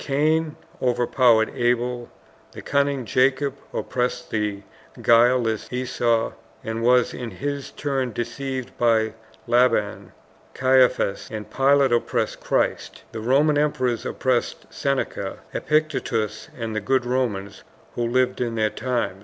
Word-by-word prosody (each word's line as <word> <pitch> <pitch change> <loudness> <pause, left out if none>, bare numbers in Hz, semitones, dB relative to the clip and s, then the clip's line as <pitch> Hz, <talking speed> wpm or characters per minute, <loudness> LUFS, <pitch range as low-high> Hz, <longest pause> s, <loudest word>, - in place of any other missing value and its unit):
Cain 155 +2 +1 0.3
overpowered 120 -2 +3
Abel, 120 -1 0 0.4
the - - -9
cunning 140 -2 0
Jacob 135 +3 +2 0.2
oppressed 125 0 -2
the 105 -2 -2 0.4
guileless 115 -1 +3
Esau 120 -2 0 0.3
and 110 0 -3
was 125 +1 +3
in 120 -2 -5
his 140 +3 -4
turn 135 -4 -2
deceived 130 +3 -4
by 110 -2 +2 0.3
Laban, 120 -4 +1 0.4
Caiaphas 130 -6 +2
and 110 -1 -7
Pilate 135 -1 +3
oppressed 120 - 0
Christ, - - -1
the 115 - -6
Roman 145 +5 +3
emperors 130 -5 0
oppressed 130 -2 -1
Seneca, 140 -1 -2 0.2
Epictetus, 115 -8 -1
and 115 -2 -4
the 110 - -1
good 130 +4 +1
Romans 120 -6 -2 0.3
who - - -4
lived 125 +2 +1
in 120 -2 -1
their 110 -1 +1
times. 120 -6 -2
125 Hz, 120 wpm, -23 LUFS, 115-135 Hz, 0.4 s, overpowered